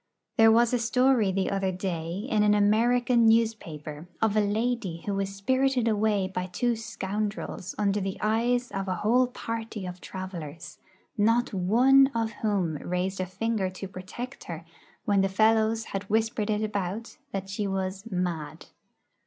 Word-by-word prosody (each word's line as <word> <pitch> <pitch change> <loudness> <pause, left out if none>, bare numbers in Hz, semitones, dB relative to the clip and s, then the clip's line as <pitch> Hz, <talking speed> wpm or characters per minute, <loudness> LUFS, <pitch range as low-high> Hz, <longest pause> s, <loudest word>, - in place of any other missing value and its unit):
There 225 0 +7
was 235 +2 +4
a 245 - +2
story 235 -2 +3
the 190 0 0
other 195 -1 0
day 180 +1 -3
in 215 -5 +2
an 210 0 +4
American 235 +3 +3
newspaper 170 -9 0
of 220 -2 +1
a 215 - +4
lady 210 -4 -1
who 205 - -1
was 195 0 -2
spirited 260 +3 +1
away 210 -3 +2
by 185 -1 -4
two 235 +6 0
scoundrels 205 -3 -4
under 205 -1 +1
the 195 0 -3
eyes 240 +3 +1
of 195 0 -3
a 185 - 0
whole 240 +7 +3
party 225 -4 -5
of 180 0 -7
travellers, 175 -4 -7 0.4
not 230 +3 +2
one 245 +9 +5
of 225 -1 0
whom 190 -8 0
raised 180 +4 -2
a 185 - -1
finger 210 0 -1
to 185 +1 -7
protect 200 +8 -8
her 165 -1 -7 0.4
when 200 -2 +3
the 195 - +1
fellows 220 +2 +3
had 195 0 -3
whispered 220 0 0
it 215 0 +1
about 205 +1 -3
that 195 -1 -4
she 200 +1 -2
was 190 0 -3
'mad.' 175 -6 -3
205 Hz, 160 wpm, -27 LUFS, 185-225 Hz, 0.4 s, There